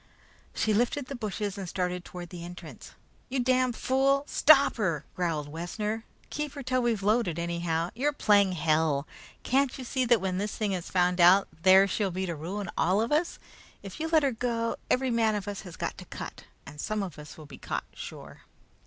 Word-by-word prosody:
She 215 - +1
lifted 245 +5 +1
the 275 - -6
bushes 210 -3 -4
and 190 -3 -5
started 180 0 -2
toward 175 -2 -9
the 175 -2 -7
entrance. 175 +1 -10 0.4
"You 260 +1 -1
damned 255 -1 +2
fool! 275 +3 +2
Stop 285 -2 +5
her!" 170 -9 -1
growled 165 -5 -1
Wessner. 210 +8 -4 0.3
"Keep 300 -1 -3
her 280 - -7
till 255 0 +1
we're 240 -2 +1
loaded, 205 -4 +1
anyhow. 170 0 -1
You're 280 +6 0
playing 205 -8 +3
hell! 155 -3 +1 0.4
Can't 270 +1 +1
you 260 - -6
see 255 +1 -1
that 240 -2 +4
when 185 0 -2
this 205 +1 -3
thing 210 -2 0
is 180 -3 -3
found 180 -1 +2
out, 185 +3 +7
there 190 +2 +7
she'll 200 0 0
be 185 +1 -3
to 170 - -3
ruin 190 +7 -5
all 185 +3 +2
of 230 +4 0
us. 315 +4 +1 0.5
If 195 -2 -9
you 320 - -1
let 320 -2 +3
her 275 - +2
go, 230 -1 -2
every 260 0 +2
man 225 -2 +2
of 205 -2 -4
us 205 -1 -4
has 180 -3 -10
got - - -4
to - - -10
cut, - - -8 0.2
and 150 - -8
some 215 -1 -2
of 175 -6 -7
us 150 0 -11
will 155 - -11
be - - -12
caught - - -3
sure." - - -10
205 Hz, 205 wpm, -28 LUFS, 175-245 Hz, 0.5 s, out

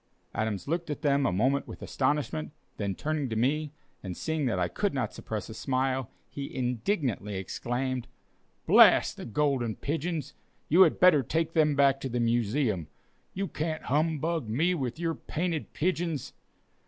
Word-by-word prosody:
Adams 110 -1 -2
looked 170 +2 -2
at 150 - -4
them 140 -1 +3
a - - +1
moment 130 +9 +1
with - - -9
astonishment, 130 - -1 0.2
then 100 -2 -2
turning 150 0 -2
to 110 - -3
me, 145 +6 +1 0.3
and 90 -3 -6
seeing 160 -3 -1
that 105 -6 0
I - - +1
could 205 -7 -1
not 125 -6 -1
suppress 110 -2 -5
a 110 - -8
smile, 130 0 -1 0.2
he 140 -1 -6
indignantly 125 - -1
exclaimed: 120 +6 -3 0.6
"Blast - - +6
the - - -7
Golden 120 -2 0
Pigeons! 155 -1 -3 0.4
You 175 +5 +6
had 175 -5 +5
better 180 -6 +7
take 160 +5 -1
them 150 -3 +3
back 140 -1 +4
to 135 - -3
the 120 0 -1
Museum. 115 - +1 0.5
You 195 +1 -1
can't 155 -1 -3
humbug 155 -1 0
me 160 +11 +2
with 130 -7 -3
your 165 0 -1
painted 165 0 -3
pigeons!" 165 -4 -1
140 Hz, 160 wpm, -29 LUFS, 120-160 Hz, 0.6 s, better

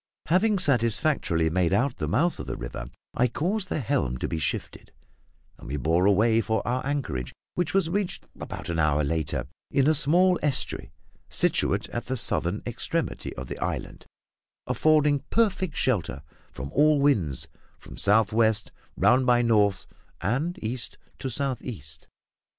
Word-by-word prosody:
Having 200 +5 +3
satisfactorily 115 - +2
made 90 0 +1
out 125 +6 +1
the - - -2
mouth 170 +6 +1
of - - -6
the - - -3
river, - - -6 0.2
I 125 - +2
caused 185 - -1
the - - -1
helm 115 - 0
to - - -3
be 80 - -3
shifted, 75 - -4 0.7
and - - -11
we 70 +4 -3
bore 85 +8 +2
away 110 +3 +4
for 110 0 -1
our 125 +1 0
anchorage, 105 - -3 0.2
which 175 -1 -1
was 195 -4 +3
reached 190 +2 -2
about - - -7
an 85 -1 -1
hour 75 -1 +2
later, 75 +1 -1 0.2
in 140 -2 +2
a 155 - +5
small 175 +4 +3
estuary 145 -3 -1 0.4
situate - - +1
at 120 - -5
the 130 +1 -1
southern - - +1
extremity - - -3
of 65 - -6
the - - -7
island, - - -4 0.6
affording 150 -2 +3
perfect 190 -7 +1
shelter 90 - 0 0.3
from 70 +2 -7
all 150 +1 +4
winds 100 - +2 0.3
from - - -12
south 105 +1 +3
west 110 -1 +2 0.3
round 125 +1 +4
by 120 -1 +4
north 105 -4 +2 0.3
and 135 - -1
east 115 +1 -3 0.2
to 135 - -3
south 130 0 -2
east. 75 - -8
120 Hz, 155 wpm, -26 LUFS, -, 0.7 s, a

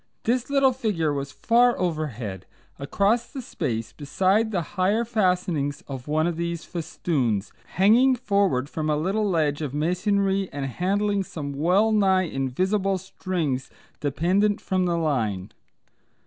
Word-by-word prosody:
This 245 +2 0
little 275 -1 +4
figure 200 - -1
was 140 -1 -4
far 240 +7 +3
overhead 130 - -3 0.3
across 205 - +1
the 275 - -8
space 120 - -4
beside 190 +9 +1
the 185 -6 -1
higher 200 +5 +1
fastening 180 - +1 0.2
of 135 -2 -7
one 155 +1 +1
of 170 -1 -1
these 170 -1 -3
festoons, 135 - -2 0.2
hanging 235 +8 +5
forward 200 - +1
from 155 0 -3
a 150 - +2
little 200 +6 0
ledge 155 -4 +1
of 145 -2 -4
masonry 195 +4 +1
and 140 -1 -4
handling 200 +8 0
some 145 -5 -6
well 180 +10 +2
nigh 190 -3 +3
invisible 185 +7 0
strings 170 -7 -3 0.3
dependent 185 +9 +1
from 185 -1 0
the 170 -1 0
line. 110 - -1
180 Hz, 135 wpm, -25 LUFS, 145-200 Hz, 0.3 s, hanging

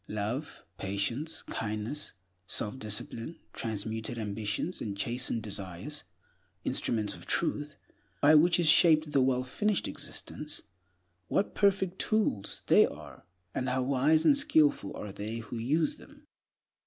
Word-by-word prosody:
Love, 110 +9 -4 0.2
patience, 115 +11 -2
kindness, 110 +7 -3 0.3
self 105 +7 -2
discipline, 115 +7 -3 0.2
transmuted 110 +1 -3
ambitions, 105 - -2
and 100 -3 -4
chastened 120 +1 0
desires—instruments 95 - -3
of - - -11
Truth, 150 0 -1 0.4
by 150 +2 +6
which 170 +3 +6
is 170 - +3
shaped 155 0 +7
a - - +6
wellfinished 130 +11 +1
existence, - - -6 0.6
what 200 - 0
perfect 190 -2 +2
tools 210 - 0
they - - +6
are, - - -11 0.3
and 130 0 -1
how 130 0 +1
wise 140 +4 +3
and 290 - +7
skillful 295 0 +3
are 105 - -6
they 105 +3 -5
who 115 +1 -6
use 150 +7 +1
them! - - -17
125 Hz, 120 wpm, -30 LUFS, 105-155 Hz, 0.6 s, shaped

